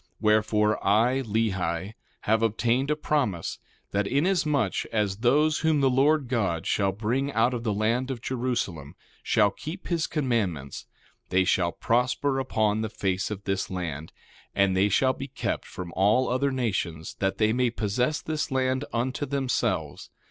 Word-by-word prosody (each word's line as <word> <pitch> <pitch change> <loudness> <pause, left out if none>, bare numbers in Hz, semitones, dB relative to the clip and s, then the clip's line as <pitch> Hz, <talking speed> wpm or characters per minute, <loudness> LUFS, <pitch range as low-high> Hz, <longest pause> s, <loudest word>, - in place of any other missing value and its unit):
1:9 - - -38
Wherefore, 105 0 +2
I, 120 +6 +3
Lehi, 100 -5 -1 0.3
have 110 +1 +2
obtained 120 +4 +1
a 150 - +2
promise, 130 - -1 0.3
that 100 0 0
inasmuch 150 - +1
as 105 -3 0
those 150 +7 +3
whom 160 -2 +2
the 135 -1 +3
Lord 140 +2 +3
God 100 -10 -1
shall 100 -1 +1
bring 120 +8 -1
out 115 +3 +2
of 120 - -3
the 110 - 0
land 115 +5 0
of 130 -3 -3
Jerusalem 120 - -3 0.3
shall 105 -2 +3
keep 155 - -8
his 170 -2 0
commandments, 105 - -2 0.4
they 95 +1 +3
shall 90 -1 +2
prosper 125 - 0
upon 110 -4 0
the 110 - -2
face 95 -2 -1
of 100 -2 -6
this 95 -1 -2
land; 80 -5 -5 0.4
and 95 -1 +3
they 100 +2 +3
shall 130 +6 +3
be 135 - -6
kept 135 - -3
from 85 -2 -7
all 105 +7 +3
other 130 +3 +1
nations, 95 -10 -2
that 95 -1 0
they 110 0 +2
may 125 0 +2
possess 120 +6 -1
this 155 0 -2
land 130 0 0
unto 130 +4 -2
themselves. 135 -3 -1
115 Hz, 160 wpm, -26 LUFS, 100-130 Hz, 0.4 s, I